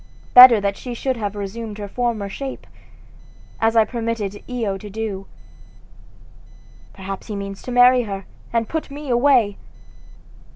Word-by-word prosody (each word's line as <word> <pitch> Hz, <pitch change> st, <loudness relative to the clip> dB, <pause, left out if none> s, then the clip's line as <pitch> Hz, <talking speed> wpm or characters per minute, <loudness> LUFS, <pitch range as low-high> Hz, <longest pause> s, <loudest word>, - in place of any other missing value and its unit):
Better 250 Hz, -3 st, +10 dB
that 200 Hz, 0 st, -2 dB
she 245 Hz, -2 st, -7 dB
should 260 Hz, +2 st, -2 dB
have 205 Hz, -2 st, -4 dB
resumed 205 Hz, +2 st, -6 dB
her 205 Hz, -1 st, -6 dB
former 230 Hz, -2 st, -2 dB
shape, 265 Hz, +7 st, -7 dB, 0.9 s
as 225 Hz, +1 st, +1 dB
I 225 Hz, -1 st, +5 dB
permitted 225 Hz, -4 st, -4 dB
Io 230 Hz, -6 st, -2 dB
to 205 Hz, +2 st, -9 dB
do. 205 Hz, -2 st, -5 dB, 1.6 s
Perhaps 195 Hz, 0 st, -8 dB
he 215 Hz, -, -5 dB
means 200 Hz, -1 st, -6 dB
to 250 Hz, -, -7 dB
marry 245 Hz, +1 st, +6 dB
her, 195 Hz, -4 st, -6 dB, 0.3 s
and 230 Hz, -1 st, 0 dB
put 320 Hz, -2 st, -4 dB
me 285 Hz, -1 st, -6 dB
away! 240 Hz, -4 st, +3 dB
225 Hz, 140 wpm, -21 LUFS, 200-245 Hz, 1.6 s, Better